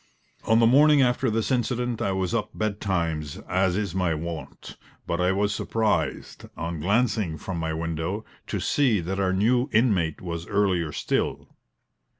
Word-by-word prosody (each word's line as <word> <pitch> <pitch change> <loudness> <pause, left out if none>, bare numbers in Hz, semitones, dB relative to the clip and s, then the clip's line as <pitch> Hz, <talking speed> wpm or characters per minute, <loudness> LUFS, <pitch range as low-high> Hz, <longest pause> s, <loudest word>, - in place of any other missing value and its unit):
On 110 - +4
the 115 - +5
morning 145 +4 +6
after 125 +1 +1
this 110 +3 -1
incident 125 -1 -1
I 100 - 0
was 95 +1 -1
up 110 -3 -2
betimes, 85 -8 -2
as 95 0 +1
is 100 -5 -2
my 90 -4 0
wont; 80 0 -7 0.3
but 85 +1 -1
I 90 +1 +3
was 100 +2 +1
surprised, 110 0 -1
on 85 -1 -4
glancing 100 -2 +1
from 85 +3 -5
my 80 -1 -2
window, 80 +6 -3 0.2
to - - -2
see 130 -8 +2
that 95 +3 -3
our 95 -1 +1
new 120 +8 +2
inmate 100 -9 +2
was 85 -1 -5
earlier 95 -6 +1
still. - - -2
95 Hz, 155 wpm, -25 LUFS, 85-115 Hz, 0.3 s, morning